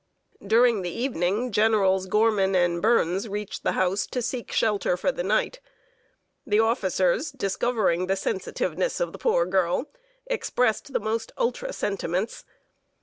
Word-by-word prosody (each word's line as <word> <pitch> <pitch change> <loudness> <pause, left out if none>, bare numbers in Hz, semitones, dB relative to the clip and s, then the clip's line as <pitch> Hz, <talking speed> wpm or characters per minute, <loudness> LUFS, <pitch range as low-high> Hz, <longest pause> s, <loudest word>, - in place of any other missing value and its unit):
During 225 +1 +4
the 180 - -3
evening, 230 +1 -1
Generals 195 -3 +2
Gorman 205 -2 +2
and 175 -1 +2
Burns 205 -2 +2
reached 205 0 -5
the - - 0
house 185 +2 0
to 250 - -3
seek 240 0 -4
shelter 205 -4 +1
for 275 - 0
the 255 - -4
night. 215 - 0 0.8
The 215 -7 +1
officers, 220 - +1
discovering 200 -6 0
the 195 - +1
sensitiveness 185 -2 -2
of 170 -1 -2
the - - -9
poor 170 - +2
girl, 185 - 0 0.3
expressed 275 - -1
the - - 0
most 225 +1 -3
ultra - - -1
sentiments. 195 - -3
205 Hz, 140 wpm, -25 LUFS, 185-235 Hz, 0.8 s, During